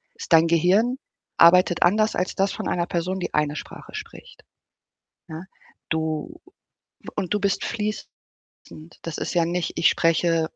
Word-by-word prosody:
Ist - - -8
dein 165 0 +6
Gehirn 185 +10 +2 0.4
arbeitet 175 0 +5
anders 215 +5 +3
als 180 - -1
das 195 0 0
von - - -5
einer 170 -1 -1
Person, 180 +2 -2
die 185 - -5
eine 150 0 0
Sprache - - -10
spricht, 460 +3 -10 0.8
ja? 160 0 -8 0.5
Du 160 - -3 0.7
und 195 -2 -2
du 210 - 0
bist 200 -1 0
fließend. 215 -1 -3 0.9
Das 165 -2 -6
ist - - -4
ja 170 -1 +3
nicht 175 0 -2
ich 165 - +3
spreche 165 0 +1
175 Hz, 150 wpm, -23 LUFS, 165-200 Hz, 0.9 s, dein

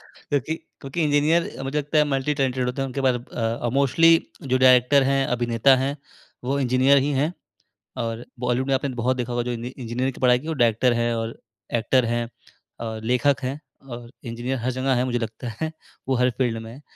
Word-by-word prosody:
क्योंकि 145 +2 -2 0.3
क्योंकि 140 +5 -2
इंजीनियर 150 +3 +3
अ, - - -4
मुझे 135 +3 -3
लगता 150 +2 -1
है 150 - +6
मल्टी-टैलेंटेड 135 -2 0
होते 125 +2 -2
हैं। 135 - -1
उनके 135 +2 -4
पास 130 -2 +3
अ 120 -1 -3
अ, - - +1
मोस्टली 140 +4 +4 0.3
जो 130 -1 +1
डायरेक्टर 130 +2 +5
हैं, 135 0 +2
अभिनेता 120 +2 +3
हैं, 135 +2 -1 0.5
वो 135 +3 0
इंजीनियर 130 +1 +4
ही 145 - 0
हैं 155 +4 0 0.7
और 115 +1 -4 0.2
बॉलीवुड 125 +2 0
में 135 - +2
आपने 135 +1 -1
बहुत 130 +2 +1
देखा 125 -1 -3
होगा 120 0 0
जो 125 - -2
इनी 120 +1 -4
इंजीनियरिंग 125 +1 -3
की - - -12
पढ़ाई 125 -1 +5
की - - -6
और 160 - -2
डायरेक्टर 120 +2 +3
हैं 120 0 +1
और 115 0 -4 0.4
एक्टर 130 +3 +2
हैं 120 0 -1 0.6
और 110 -1 -5
लेखक 140 +3 +2
हैं 130 +3 -3 0.3
और 120 -1 -8 0.2
इंजीनियर 125 +3 -3
हर 130 - +1
जगह 130 0 +1
हैं। - - +1
मुझे 120 - +1
लगता 115 +2 -5
है 160 0 -2 0.4
वो 135 - +2
हर 125 - +4
फ़ील्ड 120 -4 0
में 115 - -9
हैं। 135 +5 -13
130 Hz, 210 wpm, -23 LUFS, 120-140 Hz, 0.7 s, है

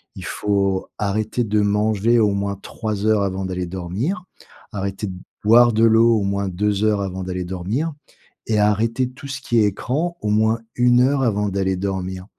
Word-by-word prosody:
il - - -8
faut 100 -2 0
arrêter 110 +4 -1
de 105 -1 +1
manger 105 +3 +2
au 105 -2 +3
moins 100 0 -2
3 110 -1 -1
avant 95 0 -2
d'aller 90 -1 -3
dormir, 95 - -3 0.5
arrêter 100 +1 -4
de 95 - -5 0.3
boire 120 +2 +6
de 110 - +2
l'eau 115 0 +5
au 100 - -2
moins 100 0 -1
2 105 +2 0
avant 95 -1 -4
d'aller 90 0 -4
dormir, 100 - -2 0.6
et 110 - +2
arrêter 115 +4 +1
tout 135 +2 -11
ce 135 - -5
qui 120 - +1
est 105 - +4
écran 150 - -2
au 105 - -2
moins 110 +2 +2 0.2
1 125 +3 +3
avant 105 -3 +1
d'aller 95 -1 0
dormir. 95 -1 -4
105 Hz, 170 wpm, -21 LUFS, 95-115 Hz, 0.6 s, boire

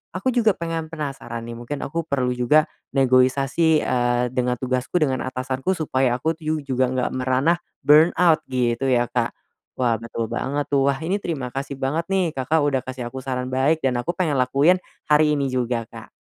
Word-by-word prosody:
aku 230 +7 0
juga 225 -4 +3
pengen 165 -1 -3
penasaran 135 -7 -5
nih 115 0 -7
mungkin 135 +4 -6
aku 165 +3 -3
perlu 125 -3 0
juga 125 +5 +3 0.3
negoisasi, 135 +5 +3
eee, 120 -1 +1
dengan 125 -1 0
tugasku 130 +6 -1
dengan 135 -4 +1
atasanku 130 +5 -2
supaya 130 -5 +1
aku 160 +4 0
tuh 155 -1 -2
juga 130 -1 +1
enggak 130 -1 -1
merana 130 +6 +2 0.3
burnout 160 +2 +5
gitu 125 0 0
ya 120 -1 +3
Kak. 120 -2 0 0.5
Wah 120 -3 +2
betul 115 0 -4
banget 145 +2 -2
tuh, 140 -1 +3
wah 140 - +1
ini 190 +5 0
terima 135 -9 -4
kasih 140 +1 -4
banget 155 +6 -1
nih 185 -4 +1
Kakak 150 +4 +1
udah 135 -3 +1
kasih 130 -2 -5
aku 130 - -6
saran 130 -1 -3
baik 140 +5 +2
dan 130 -2 +1
aku 165 +8 -1
pengen 155 -7 +1
lakuin 140 +8 +3 0.3
hari 150 0 +4
ini 140 -1 0
juga 125 -2 -1
Kak. - - -11
135 Hz, 180 wpm, -22 LUFS, 125-155 Hz, 0.5 s, burnout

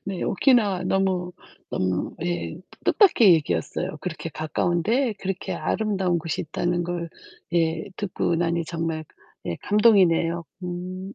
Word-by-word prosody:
네. 195 -2 -4
오키나와 205 -5 +3
너무 185 -2 0 0.4
너무 95 -1 -1
예 175 -2 -2 0.3
뜻밖의 295 - +6
얘기였어요. 90 - -2
그렇게 - - -5
가까운데 175 - 0
그렇게 195 -1 -3
아름다운 195 -5 0
곳이 165 0 -3
있다는 175 +2 -1
걸 175 -1 -3 0.5
예 165 -1 +1
듣고 185 -3 -1
나니 170 0 0
정말 165 -1 -3 0.4
예 85 - -2
감동이네요. 180 -6 +3 0.2
음. 185 +2 -5
175 Hz, 280 characters per minute, -24 LUFS, 165-195 Hz, 0.5 s, 뜻밖의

